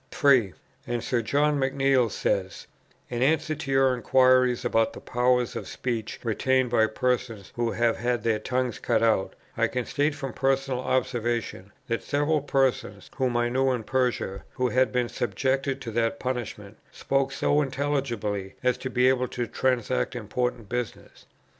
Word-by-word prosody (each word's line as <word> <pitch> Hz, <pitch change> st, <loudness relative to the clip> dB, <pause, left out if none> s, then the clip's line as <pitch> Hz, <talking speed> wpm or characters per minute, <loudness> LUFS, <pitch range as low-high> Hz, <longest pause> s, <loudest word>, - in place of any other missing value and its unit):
3. 135 Hz, -, +3 dB, 0.3 s
And 120 Hz, -1 st, -2 dB
Sir 125 Hz, -3 st, 0 dB
John 145 Hz, +5 st, +1 dB
McNeill 135 Hz, -2 st, +2 dB
says, 95 Hz, -1 st, -2 dB, 0.5 s
"In 120 Hz, 0 st, -2 dB
answer 155 Hz, +3 st, +2 dB
to 145 Hz, -2 st, -6 dB
your 135 Hz, -1 st, +4 dB
inquiries 125 Hz, 0 st, +3 dB
about 115 Hz, 0 st, +2 dB
the -, -, -9 dB
powers 125 Hz, 0 st, +1 dB
of -, -, -5 dB
speech 115 Hz, -4 st, -4 dB
retained 130 Hz, +2 st, +1 dB
by 110 Hz, -2 st, +4 dB
persons 120 Hz, -3 st, -2 dB
who 120 Hz, -1 st, -1 dB
have 115 Hz, 0 st, +1 dB
had 120 Hz, 0 st, -1 dB
their 110 Hz, -2 st, +1 dB
tongues 125 Hz, 0 st, -2 dB
cut -, -, +1 dB
out, 110 Hz, -4 st, +1 dB, 0.2 s
I -, -, +2 dB
can 125 Hz, -1 st, -3 dB
state 145 Hz, +1 st, 0 dB
from 135 Hz, -2 st, -5 dB
personal 135 Hz, -1 st, 0 dB
observation, 120 Hz, -5 st, -2 dB, 0.2 s
that 115 Hz, -1 st, -1 dB
several 145 Hz, +1 st, 0 dB
persons 130 Hz, -7 st, -1 dB
whom 130 Hz, -3 st, +1 dB
I 120 Hz, 0 st, +1 dB
knew 130 Hz, +2 st, +2 dB
in 120 Hz, -3 st, -3 dB
Persia, 125 Hz, -6 st, -1 dB
who 125 Hz, 0 st, 0 dB
had 130 Hz, +1 st, +2 dB
been 125 Hz, -1 st, 0 dB
subjected 135 Hz, +3 st, -1 dB
to 115 Hz, -, -5 dB
that 115 Hz, 0 st, 0 dB
punishment, 115 Hz, -5 st, -5 dB
spoke 135 Hz, 0 st, 0 dB
so 145 Hz, +2 st, +2 dB
intelligibly 130 Hz, -9 st, -2 dB
as 125 Hz, 0 st, +1 dB
to 130 Hz, -, -4 dB
be 125 Hz, 0 st, +3 dB
able 130 Hz, -1 st, +2 dB
to 120 Hz, -1 st, -3 dB
transact 125 Hz, +1 st, 0 dB
important 120 Hz, 0 st, -3 dB
business.... 120 Hz, 0 st, -6 dB
125 Hz, 160 wpm, -26 LUFS, 115-135 Hz, 0.5 s, your